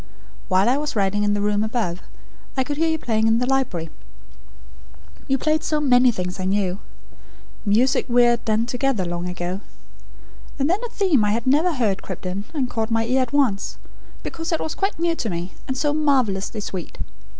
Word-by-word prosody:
While 190 +3 +3
I 255 +3 +3
was 295 -2 -3
writing 205 0 +1
in 205 0 +2
the 205 - -1
room 205 0 +1
above, 215 -6 -2 0.6
I 265 - +3
could 285 +2 -4
hear 325 +1 +2
you 320 - +1
playing 220 -6 +1
in 225 0 +4
the 250 - +1
library. 250 -12 -1 1.4
You 270 - +2
played 310 +3 +1 0.2
many 250 -3 +5
things 180 -3 -4
I 185 - -2
knew 190 -1 0 0.9
music 235 +6 +3
we 245 0 +5
had 240 -1 +3
done 220 +1 +1
together, 245 -4 0
long 175 +1 -3
ago. 180 +2 -4 1.0
And 275 -1 +1
then 365 +5 +2
a 480 - -3
theme 370 - +2
I 205 0 +2
had 230 +1 -2
never 305 +7 +3
heard 215 -7 0
crept 185 -1 -7
in, 190 +3 -3
and 275 -5 -1
caught 225 -2 -2
my 225 0 +1
ear 255 +3 +2
at 250 -2 -2
once, 260 -9 +1 0.5
because 325 +1 -4
it 325 - +1
was 315 - -3
quite 390 +1 -1
new 335 0 +1
to 230 - -3
me, 175 0 -4
and 265 - -2
so 295 +2 +1
marvellously 250 -9 +1
sweet. 185 -3 -6
235 Hz, 195 wpm, -22 LUFS, 200-275 Hz, 1.4 s, many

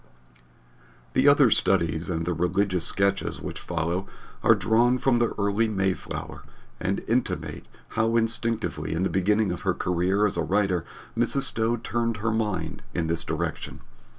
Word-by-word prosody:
The - - +3
other - - +6
Studies 85 +2 +1
and 85 -2 -2
the 90 - 0
Religious 90 +1 +1
Sketches 100 0 0
which - - -6
follow 85 +2 -2 0.3
are - - +5
drawn 120 +3 +3
from 125 -1 +2
the 120 - +1
early 100 +2 +1
Mayflower 95 -3 -3 0.4
and 95 +1 -2
intimate 120 +2 -2 0.2
how 115 +1 0
instinctively 115 -3 -1
in 85 +3 -1
the 95 - +1
beginning 105 +1 +2
of 90 - -5
her 95 -3 0
career 90 +4 +1
as 95 - 0
a - - +1
writer 95 -1 +1 0.3
Mrs. 120 +4 +3
Stowe 115 -2 +2
turned 115 0 -2
her 110 +2 -1
mind 105 -7 -2
in 85 - 0
this 85 0 -1
direction. - - -4
100 Hz, 150 wpm, -26 LUFS, 90-115 Hz, 0.4 s, other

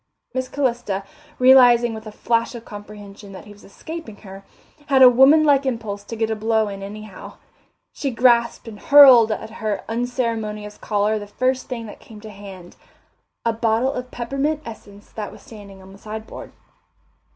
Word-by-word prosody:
Miss 260 0 -3
Calista, 240 -8 -2 0.3
realizing 245 -2 +5
with 220 0 -9
a - - -8
flash 230 +3 -1
of 235 0 -10
comprehension 205 -1 -11
that 190 - -11
he 210 - -13
was 205 - -20
escaping 315 +3 -9
her, 195 -1 -12 0.4
had 270 -3 +5
a - - +11
woman 270 +6 +5
like 285 -2 +3
impulse 225 -6 -4
to 230 - -7
get 225 0 -2
a - - -1
blow 220 0 0
in 195 -1 -8
anyhow; 205 0 -10 0.6
she 280 - -3
grasped 235 -1 +2
and 210 -2 -10
hurled 260 -6 +7
at 220 +1 -5
her 215 -3 -4
unceremonious 225 -3 -4
caller 210 +1 -1
the 205 - -9
first 255 +5 -2
thing 235 -3 -5
that 210 - -11
came 215 -2 -14
to 215 0 -10
hand 195 -3 -12 0.7
a 230 - +1
bottle 230 +4 0
of 250 -1 -6
peppermint 275 +6 -3
essence 205 -3 -12
that 210 -2 -7
was - - -15
standing 200 -3 -13
on 190 - -15
the 195 - -15
sideboard. 220 +1 -9
225 Hz, 175 wpm, -21 LUFS, 205-250 Hz, 0.7 s, a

